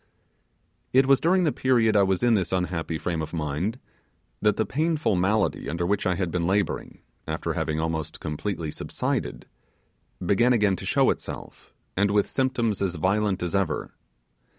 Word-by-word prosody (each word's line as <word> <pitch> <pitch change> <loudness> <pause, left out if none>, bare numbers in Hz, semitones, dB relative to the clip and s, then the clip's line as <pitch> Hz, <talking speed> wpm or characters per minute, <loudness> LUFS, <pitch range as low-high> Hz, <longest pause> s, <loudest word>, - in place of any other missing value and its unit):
It 130 +1 +6
was 135 0 +5
during 185 +2 +3
the 155 - +2
period 120 -6 +2
I 100 - +6
was 95 0 +1
in 120 -1 +4
this 95 -5 +1
unhappy 90 -3 -1
frame 85 0 -2
of 80 +2 -5
mind 80 - -2 0.6
that 105 -1 +3
the 110 - +1
painful 155 - 0
malady 100 +3 +1
under 85 +1 -1
which 100 +2 0
I 90 - +2
had 90 -1 -2
been 85 -1 0
labouring 100 +2 -1 0.3
after - - -2
having 80 0 -1
almost 80 -1 -3
completely 80 +1 -3
subsided - - -3 0.8
began 115 +7 +4
again 105 -5 +3
to - - -7
show - - +4
itself, - - -8 0.2
and 100 +2 +2
with 100 0 +1
symptoms 120 -6 0
as 95 -3 0
violent 95 +3 +1
as 90 - -2
ever. 95 -6 -1
100 Hz, 165 wpm, -25 LUFS, 85-110 Hz, 0.8 s, It